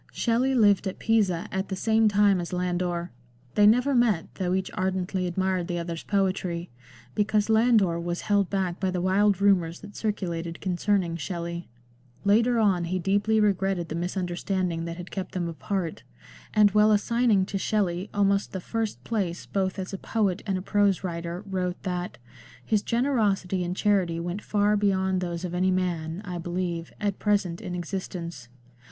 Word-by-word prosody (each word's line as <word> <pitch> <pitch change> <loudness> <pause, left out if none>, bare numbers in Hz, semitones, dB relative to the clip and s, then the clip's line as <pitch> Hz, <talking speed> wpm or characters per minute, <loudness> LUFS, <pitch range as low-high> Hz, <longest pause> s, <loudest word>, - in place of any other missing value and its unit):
Shelley 250 +3 +1
lived 205 -4 +4
at 190 - -4
Pisa 200 -7 +1
at 190 +1 -2
the 190 - -2
same 220 +3 +3
time 205 -2 +4
as 170 - -6
Landor; 180 -1 -1 0.4
they 205 0 +5
never 250 +6 +4
met, 230 -9 +2
though 185 -1 -1
each 190 0 -2
ardently 185 0 -1
admired 185 0 -1
the 175 -2 -2
other's 170 -1 -4
poetry, 185 -3 -1 0.4
because 210 - +1
Landor 220 -7 +4
was 175 +1 -3
held 200 -2 +1
back 190 -3 -1
by 190 - 0
the 180 -1 -1
wild 195 +2 +3
rumours 180 -4 +2
that 205 -1 -11
circulated 170 -6 -3
concerning 185 -2 0
Shelley. 170 +2 -5 0.6
Later 230 +4 +4
on 195 -6 +2
he 185 +2 -1
deeply 205 +4 +2
regretted 195 -4 +1
the 160 - -3
misunderstanding 175 -1 -2
that 170 0 -5
had 180 0 -8
kept 190 -1 -5
them 175 -2 -1
apart, 170 +1 -3 0.5
and 210 -1 +5
while 210 +1 +5
assigning 215 -1 +3
to 195 0 -3
Shelley 190 -2 0
almost 200 0 +1
the 190 - -2
first 225 +3 -3
place 190 -7 -2
both 190 -1 -1
as 190 0 -5
a 195 - -4
poet 205 -4 0
and 195 -1 0
a 185 - -5
prose 200 -2 +2
writer, 170 +1 -4
wrote 185 -2 -3
that 180 -1 -3 0.3
" - - -21
his 215 -2 +2
generosity 210 -8 +1
and 175 +1 -3
charity 190 -5 +2
went 175 +4 -4
far 210 0 +2
beyond 190 -2 +1
those 175 0 -3
of 175 - -5
any 185 +1 +2
man 175 -1 -1
(I 180 -2 -4
believe) 175 -1 -3
at 205 -2 -1
present 200 -5 0
in 180 - -5
existence." 170 -5 -5
190 Hz, 170 wpm, -26 LUFS, 175-205 Hz, 0.6 s, they